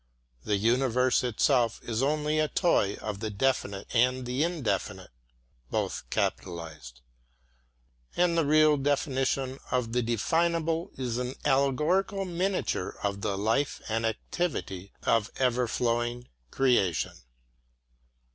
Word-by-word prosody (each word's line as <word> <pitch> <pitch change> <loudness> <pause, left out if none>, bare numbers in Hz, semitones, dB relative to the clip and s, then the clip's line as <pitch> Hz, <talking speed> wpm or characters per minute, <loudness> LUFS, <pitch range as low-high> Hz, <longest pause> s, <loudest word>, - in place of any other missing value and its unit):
The 105 - +1
universe 125 +4 +2
itself 120 0 +2
is 115 0 -2
only 150 +2 +1
a 155 - +2
toy 140 - +2
of 105 -2 -5
the 110 0 -3
Definite 100 -3 -1
and 125 +1 +2
the 125 +4 0
Indefinite; 165 - -2 0.6
and - - 0 2.5
the - - +3
real 155 0 +5
definition 135 -1 0
of 120 -3 -1
the 125 - +2
definable 165 +8 0
is 125 -2 -2
an 125 +1 -3
allegorical 150 +9 +2
miniature 180 - -1
of 100 -1 -2
the 100 -2 -1
life 115 +8 0
and 115 +1 -1
activity 110 - -3
of 115 0 +2
ever 125 -1 +2
flowing 120 +1 -1 0.2
creation. 120 - +2
125 Hz, 110 wpm, -28 LUFS, 115-150 Hz, 2.5 s, real